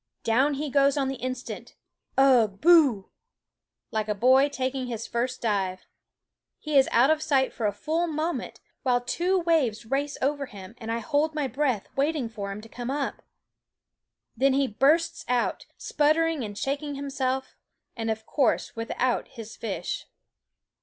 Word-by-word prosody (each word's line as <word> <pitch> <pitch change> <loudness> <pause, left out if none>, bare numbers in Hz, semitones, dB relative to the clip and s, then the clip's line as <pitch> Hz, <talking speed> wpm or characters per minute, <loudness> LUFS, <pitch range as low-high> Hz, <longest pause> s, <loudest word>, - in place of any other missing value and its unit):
Down 265 +6 +2
he 290 0 -3
goes 280 0 +3
on 270 -2 +1
the 270 - -4
instant, 255 0 -5 0.4
ugh! 240 -7 +4
boo! 295 - +5 0.8
like 215 -1 -1
a 210 - -1
boy 260 +6 +5
taking 260 -1 -2
his 230 -2 -4
first 245 +2 -3
dive. 190 -4 -1 0.7
He 305 -2 -4
is 270 -1 +6
out 260 +6 +5
of 315 -1 +1
sight 270 -4 +1
for 225 - -1
a - - +1
full 320 - -1
moment, 320 +2 -3 0.2
while 250 -2 +2
two 350 +10 0
waves 280 -11 +1
race 280 +4 -1
over 280 0 -1
him, 195 -1 -11
and 225 0 -5
I 230 - 0
hold 300 +5 0
my 300 -2 0
breath 260 -5 -1
waiting 280 -3 0
for 200 -3 -5
him 200 +2 -6
to 225 - -12
come 240 +2 -6
up. 280 0 -2 1.1
Then 265 +3 +3
he 275 +1 +3
bursts 325 +8 +2
out, 245 -1 0
sputtering 310 -1 +1
and 205 -2 -6
shaking 285 +4 -2
him 280 0 -5
self, 265 -1 -2 0.4
and 225 -1 -3
of 220 0 -3
course 270 -3 0
without 235 +2 -1
his 225 -3 -10
fish. 215 -4 -4
265 Hz, 160 wpm, -26 LUFS, 230-290 Hz, 1.1 s, is